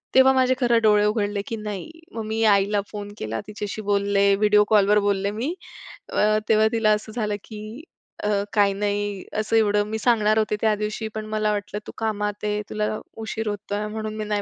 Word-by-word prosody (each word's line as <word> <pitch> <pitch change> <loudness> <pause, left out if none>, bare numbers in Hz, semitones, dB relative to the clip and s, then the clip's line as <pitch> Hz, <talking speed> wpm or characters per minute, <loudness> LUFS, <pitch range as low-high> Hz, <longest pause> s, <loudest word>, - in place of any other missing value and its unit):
तेव्हा 265 0 +7
माझे 260 0 +3
खरे 240 -2 +3
डोळे 210 -2 +4
उघडले, 205 -1 0
की 225 - -3
नाही, 210 - -6 0.2
मग 225 -1 -5
मी 220 +1 -1
आईला 200 +1 +2
फोन 205 -1 -6
केला 110 +1 -4
तिच्याशी 210 0 -5
बोलले, 200 -1 +2
व्हिडिओ 210 0 +4
कॉलवर 210 -1 +5
बोलले 200 -1 0
मी 240 +10 -2 0.6
अ, 215 0 +3
तेव्हा 220 0 +5
तिला 225 -2 +2
असं 215 +1 -1
झालं 210 -3 -1
की 215 +6 -9 0.4
अ, - - 0 0.3
काही 205 -2 +4
नाही, 205 -1 -2 0.2
असं 215 +1 0
एवढं 210 -2 +3
मी 220 +1 -3
सांगणार 215 -2 +3
होते 215 -1 +1
त्या 220 -1 +3
दिवशी 215 +1 -3
पण 215 0 -4
मला 215 0 0
वाटलं, 205 0 -3
तू - - -6
कामात 210 -2 -2
आहे, 210 0 -1
तुला 210 0 -1 0.4
उशीर 220 0 -4
होतोय 205 0 -3
म्हणून 215 0 -5
मी 215 - -3
नाही 210 -1 -1
210 Hz, 190 wpm, -23 LUFS, 205-220 Hz, 0.6 s, तेव्हा